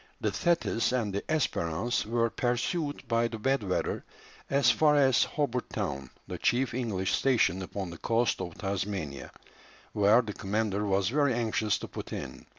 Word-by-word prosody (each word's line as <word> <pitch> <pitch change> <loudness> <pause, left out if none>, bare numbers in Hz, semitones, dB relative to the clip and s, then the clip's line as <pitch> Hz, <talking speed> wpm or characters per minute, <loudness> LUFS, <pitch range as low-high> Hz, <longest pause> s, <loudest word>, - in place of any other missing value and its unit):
The - - 0
Thetis 170 -10 +1
and 110 -6 0
the 100 - -1
Espérance 120 - 0
were 115 0 +1
pursued 145 +5 -1
by 115 0 +2
the 115 -1 -6
bad 135 +4 +1
weather 95 -3 -2 0.5
as 135 -3 +4
far 150 +5 +4
as 135 -4 +5
Hobart 130 -5 -2
Town, 70 -1 -3 0.2
the - - -6
chief 125 +1 +1
English 105 -7 -1
station 115 -8 +2
upon 95 -1 -5
the 85 - -10
coast 115 -3 +1
of 90 -3 -6
Tasmania, 95 -8 -3 0.6
where 105 +4 +5
the 105 -2 -5
commander 105 0 -1
was 95 0 +2
very 140 -1 +2
anxious 110 -3 0
to - - -7
put - - -8
in. 65 -2 -7
115 Hz, 160 wpm, -29 LUFS, 100-125 Hz, 0.6 s, as